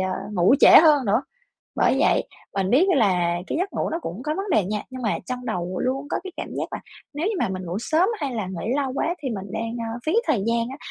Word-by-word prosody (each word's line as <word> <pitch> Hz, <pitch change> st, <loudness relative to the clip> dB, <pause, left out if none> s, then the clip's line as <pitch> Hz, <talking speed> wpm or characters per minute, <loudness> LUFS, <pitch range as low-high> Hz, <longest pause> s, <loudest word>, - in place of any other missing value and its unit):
ờ, 190 Hz, 0 st, -1 dB, 0.2 s
ngủ 185 Hz, +6 st, +4 dB
trễ -, -, +8 dB
hơn 295 Hz, -5 st, +5 dB
nữa. 220 Hz, +6 st, +2 dB, 0.5 s
Bởi -, -, +3 dB
vậy, -, -, +3 dB, 0.3 s
mình 195 Hz, 0 st, 0 dB
biết 290 Hz, +10 st, +5 dB
là 180 Hz, -7 st, +2 dB
cái -, -, -2 dB
giấc 380 Hz, +3 st, -2 dB
ngủ -, -, -2 dB
nó 330 Hz, -, -2 dB
cũng 190 Hz, -, -6 dB
có 305 Hz, 0 st, -1 dB
vấn 390 Hz, +2 st, -3 dB
đề 215 Hz, -, +3 dB
nha, 210 Hz, +2 st, -3 dB
nhưng 255 Hz, 0 st, -7 dB
mà 215 Hz, -, 0 dB
trong 250 Hz, 0 st, -5 dB
đầu 180 Hz, +1 st, -3 dB
luôn 270 Hz, +3 st, -1 dB
có -, -, 0 dB
cái 375 Hz, -, -7 dB
cảm -, -, -5 dB
giác -, -, -2 dB
là -, -, -4 dB, 0.3 s
nếu 310 Hz, +6 st, -2 dB
như 435 Hz, -, 0 dB
mà -, -, +1 dB
mình 185 Hz, 0 st, -4 dB
ngủ 175 Hz, +4 st, -3 dB
sớm 315 Hz, +9 st, +2 dB
hay 270 Hz, -4 st, -2 dB
là 215 Hz, -4 st, -2 dB
nghỉ 190 Hz, +5 st, -3 dB
lâu 270 Hz, -3 st, -1 dB
quá 335 Hz, +5 st, 0 dB
thì 265 Hz, -, -2 dB
mình 200 Hz, -3 st, -5 dB
đang, 225 Hz, +1 st, -3 dB, 0.2 s
ờ, 240 Hz, -, -5 dB
phí 315 Hz, -, +1 dB
thời 250 Hz, -11 st, +1 dB
gian 230 Hz, 0 st, +1 dB
á, 270 Hz, -, -7 dB
235 Hz, 265 wpm, -23 LUFS, 195-290 Hz, 0.5 s, trễ